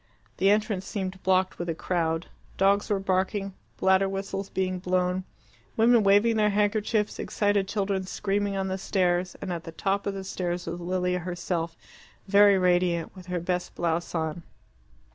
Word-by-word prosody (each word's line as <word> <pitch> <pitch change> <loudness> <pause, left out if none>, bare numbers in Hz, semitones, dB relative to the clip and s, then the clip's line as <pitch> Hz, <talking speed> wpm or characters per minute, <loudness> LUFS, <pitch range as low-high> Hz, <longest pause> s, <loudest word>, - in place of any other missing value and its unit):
The 195 - +3
entrance 210 -2 +1
seemed 190 -2 -4
blocked 185 0 +1
with 175 0 -3
a 165 - -1
crowd. 165 -1 -1 0.3
Dogs 200 +1 +3
were 205 - +2
barking, 195 +1 -1 0.2
bladder 190 +1 +3
whistles 195 0 -4
being 185 -1 -1
blown, 180 0 0 0.5
women 230 +1 +5
waving 205 +3 +4
their 210 -1 +3
handkerchiefs, 210 +1 0
excited 205 -2 +1
children 195 -2 -1
screaming 200 0 -1
on 190 0 -1
the 190 0 -3
stairs, 180 -2 0
and 185 -2 -3
at 170 -1 -5
the 165 - -8
top 195 +5 -1
of 200 - -2
the 195 - -5
stairs 180 -2 -3
was 170 +1 -4
Lilia 180 +1 -1
herself, 175 -1 -3 0.5
very 200 0 +6
radiant, 180 -2 +1
with 185 -1 -12
her 180 -1 -2
best 180 +1 -3
blouse 170 0 -1
on. 160 +1 -2
190 Hz, 160 wpm, -27 LUFS, 180-200 Hz, 0.5 s, very